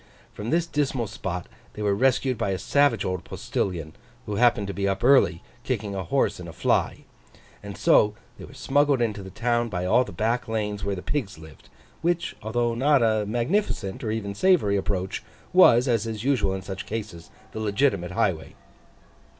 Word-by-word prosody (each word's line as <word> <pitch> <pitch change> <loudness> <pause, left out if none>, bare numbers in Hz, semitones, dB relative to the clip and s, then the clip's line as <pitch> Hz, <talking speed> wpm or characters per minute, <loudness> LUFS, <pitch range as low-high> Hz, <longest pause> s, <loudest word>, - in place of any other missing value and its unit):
From 105 +2 -6
this 170 +4 +2
dismal 140 -6 -1
spot 90 -3 -5 0.3
they 105 - -6
were 100 -1 +2
rescued 130 +3 +2
by 115 -3 -2
a 95 - -1
savage 140 +1 +2
old 90 -1 -2
postilion, 80 -5 -3 0.3
who 105 -1 -3
happened 120 -3 +3
to 100 - -5
be 100 0 -1
up 95 0 -2
early, 125 -10 +4 0.2
kicking 110 -6 -2
a 95 -1 -3
horse 85 - 0
in - - -8
a - - -9
fly: - - 0 0.6
and 100 -1 -8
so 105 0 +4 0.2
were - - -10
smuggled 145 -1 +1
into 110 -4 -1
the 95 - -9
town 120 +4 0
by 90 -3 -3
all 110 +7 +4
the 105 - -9
back 115 +7 -1
lanes 105 -2 -2
where 100 0 -1
the 90 - -7
pigs 115 - -3
lived: 80 -1 -15 0.3
which, 170 0 -1
although 120 +2 0
not 135 +2 +3
a 110 -2 +1
magnificent 120 - -1
or 110 - -2
even 110 -2 -3
savoury 125 - +3
approach, 95 -1 -2 0.3
was, 130 -9 +6
as 115 -3 +1
is 110 -1 -5
usual 125 -8 +1
in 95 - -6
such 95 0 -6
cases, 105 -7 -6 0.2
the 110 - -6
legitimate 105 -3 +1
highway. 90 -7 -1
110 Hz, 180 wpm, -25 LUFS, 100-125 Hz, 0.6 s, was